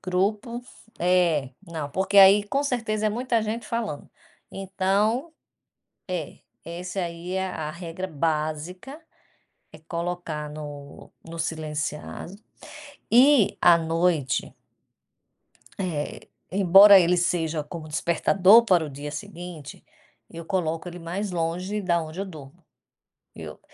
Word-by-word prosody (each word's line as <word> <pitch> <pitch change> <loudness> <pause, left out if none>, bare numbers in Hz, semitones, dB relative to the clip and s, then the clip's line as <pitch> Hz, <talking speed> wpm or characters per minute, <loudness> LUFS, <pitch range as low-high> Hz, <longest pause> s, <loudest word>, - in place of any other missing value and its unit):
Grupo 210 +6 -1 0.4
é, 175 -6 +2 0.2
não, 160 -4 -5
porque 190 +5 +2
aí 195 +1 +8
com 275 +7 -1
certeza 225 -6 -1
é - - +3
muita 235 +1 0
gente 220 +2 -4
falando. 225 -11 -4 0.4
Então, 200 - -1 0.8
é, 180 -5 -5 0.3
essa 180 +3 -5
aí 170 +1 -5
é 190 0 -1
a 155 -4 -5
regra 170 +2 -6
básica, 160 - -3 0.7
é 155 - -12
colocar 170 -2 -5
no 145 -2 -10
no 165 0 -9
silenciado. 155 +1 -4 0.8
E 250 -1 +5
à 175 -1 +7
noite 165 -4 0 1.3
Eh, 170 -6 -4 0.2
embora 195 +1 +8
ele 180 0 +3
seja 165 -3 0
como 155 +1 -8
despertador 190 +7 +4
para 180 -7 +3
o 150 - -7
dia 145 +2 -7
seguinte, 175 -4 -9 0.5
eu 165 0 -9
coloco 165 -2 -2
ele 175 - -8
mais 185 +4 -4
longe 180 +5 -2
da 175 -3 +1
onde 160 +4 -7
eu - - -2
durmo. 150 -7 -12 0.7
Eu, - - -9
175 Hz, 120 wpm, -25 LUFS, 160-200 Hz, 1.3 s, aí